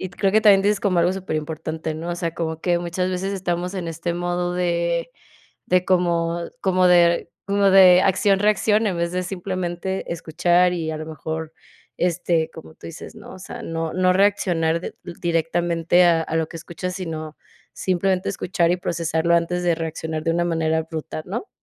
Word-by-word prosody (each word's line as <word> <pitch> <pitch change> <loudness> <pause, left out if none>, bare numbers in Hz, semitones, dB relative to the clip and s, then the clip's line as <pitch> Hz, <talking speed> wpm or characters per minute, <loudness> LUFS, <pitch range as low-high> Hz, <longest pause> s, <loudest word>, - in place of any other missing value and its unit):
y 185 - -5
creo 195 0 0
que 215 - +5
también 205 -3 +6
dices 205 +1 +2
como 185 -4 +2
algo 175 +2 +2
superimportante, 160 -3 -4
¿no? 165 +2 -5
O 175 - -2
sea, 170 -1 -3
como 160 -1 -4
que 175 0 +1
muchas 175 +2 -2
veces 190 +2 -2
estamos 180 0 -2
en 180 -3 -4
este 170 +1 -3
modo 175 0 -2
de 170 -1 0 0.6
de 180 0 +2
como 170 -2 +1 0.2
como 185 -1 +3
de 170 -1 +4 0.2
como 200 0 +3
de 185 -1 +7
acción 195 +1 +3
reacción, 210 +1 +2
en 190 -4 -1
vez 170 0 -1
de 185 0 -1
simplemente 185 0 -4
escuchar 175 +2 +2
y, 165 -3 -2
a - - -4
lo 155 - -6
mejor, 160 0 -5 0.4
este, 170 -2 0
como 160 -1 -12
tú - - -12
dices, 165 +6 -10
¿no? 215 - -11
O - - -11
sea, 185 - -8
no 165 -1 -3
no 185 0 +3
reaccionar 180 -4 +2
di - - -5 0.3
directamente 170 +1 +2
a 170 -2 +4
a 160 - -3
lo 160 -1 0
que - - -9
escuchas, 170 +2 -6
sino 160 -4 -6 0.4
simplemente 185 0 0
escuchar 180 -3 0
y - - +1
procesarlo 170 -1 -1
antes 170 +1 0
de 175 -1 +2
reaccionar 160 -1 -4
de 165 - +1
una 175 +1 +1
manera 160 -2 0
abrupta, 160 -1 -5
¿no? 220 - -5
175 Hz, 185 wpm, -22 LUFS, 165-185 Hz, 0.6 s, de